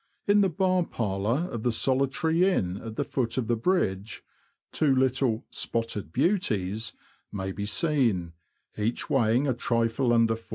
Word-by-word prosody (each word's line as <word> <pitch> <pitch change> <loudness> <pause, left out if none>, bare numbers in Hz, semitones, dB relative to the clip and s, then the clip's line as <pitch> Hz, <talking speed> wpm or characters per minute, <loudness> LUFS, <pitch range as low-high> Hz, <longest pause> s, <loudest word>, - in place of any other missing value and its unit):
In 205 0 +4
the 195 - +3
bar 185 +1 +1
parlour 115 - -1
of 115 - -4
the 120 - +1
solitary 135 +8 +1
inn 95 - -1
at 110 +1 -8
the 145 - 0
foot 125 -4 -2
of 130 - 0
the 120 - +1
bridge, 110 - -1 0.5
two 140 -4 +2
little 130 -3 +1
"spotted 110 -7 -3
beauties" 110 - 0 0.4
may 95 -1 -4
be 100 +2 -4
seen, 110 - +1 0.4
each 110 +3 -2
weighing 125 +1 +3
a 130 - +2
trifle 120 +1 0
under 115 -1 +4
4lb. 115 0 -10
120 Hz, 155 wpm, -27 LUFS, 110-140 Hz, 0.5 s, In